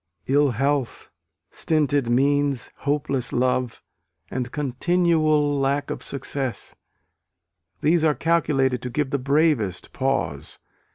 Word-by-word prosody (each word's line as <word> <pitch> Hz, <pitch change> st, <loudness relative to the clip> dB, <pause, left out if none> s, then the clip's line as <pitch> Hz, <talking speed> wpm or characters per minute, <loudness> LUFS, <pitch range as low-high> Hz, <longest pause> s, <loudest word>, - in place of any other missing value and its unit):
Ill 145 Hz, +1 st, +3 dB
health, 135 Hz, +1 st, -1 dB, 0.4 s
stinted 145 Hz, -5 st, 0 dB
means, 140 Hz, +1 st, +1 dB
hopeless 140 Hz, -3 st, -1 dB
love, 125 Hz, -1 st, 0 dB, 0.5 s
and 125 Hz, -1 st, -3 dB
continual 155 Hz, 0 st, +1 dB
lack 140 Hz, +1 st, 0 dB
of -, -, -5 dB
success 135 Hz, -2 st, -5 dB, 1.1 s
these 160 Hz, +2 st, +3 dB
are 155 Hz, -2 st, +3 dB
calculated 135 Hz, -5 st, +1 dB
to 125 Hz, -, -4 dB
give 140 Hz, +2 st, -2 dB
the 140 Hz, -, 0 dB
bravest 140 Hz, -, +1 dB
pause. 135 Hz, -, -2 dB
140 Hz, 105 wpm, -23 LUFS, 130-150 Hz, 1.1 s, Ill